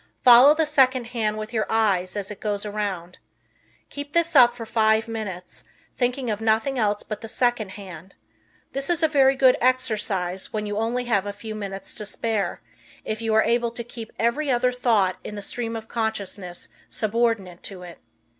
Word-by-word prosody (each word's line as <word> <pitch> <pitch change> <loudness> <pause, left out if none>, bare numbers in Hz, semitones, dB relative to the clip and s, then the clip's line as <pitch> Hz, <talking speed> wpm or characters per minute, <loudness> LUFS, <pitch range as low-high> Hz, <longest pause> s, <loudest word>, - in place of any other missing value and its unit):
Follow 250 +4 +8
the 320 0 +2
second 260 -4 +3
hand 215 -2 0
with 215 +2 -6
your 220 -2 0
eyes 200 -5 +1
as 205 0 -3
it 205 - -8
goes 205 -1 -2
around. 200 -4 -4 0.7
Keep 285 0 -7
this 335 -1 +1
up 245 -3 +8
for 230 -2 -7
five 220 0 +2
minutes, 205 -6 -6 0.3
thinking 250 -1 -1
of 210 +1 -3
nothing 225 +4 +1
else 210 -2 0
but 215 -1 -6
the 225 - -7
second 240 -2 +1
hand, 190 -2 -11 0.6
This 275 +3 -4
is 340 -1 +1
a - - +6
very 275 -3 +4
good 260 -1 +5
exercise 215 -8 0
when 210 -1 -3
you 205 0 -3
only 240 +3 -1
have 205 -4 +1
a - - -2
few 215 +2 -8
minutes 195 -2 -5
to 210 - -5
spare, 220 -1 -2 0.4
if 215 +1 -3
you 225 -1 0
are 220 - +5
able 235 +1 +1
to 235 +1 -6
keep 230 -1 -9
every 255 +6 0
other 250 0 +2
thought 220 -7 +1
in 210 - -7
the 205 - -5
stream 230 +1 -3
of 225 0 -7
consciousness 205 -6 -4 0.2
subordinate 215 -5 -1
to 185 -3 -8
it. 175 -1 -11
220 Hz, 185 wpm, -24 LUFS, 205-245 Hz, 0.7 s, Follow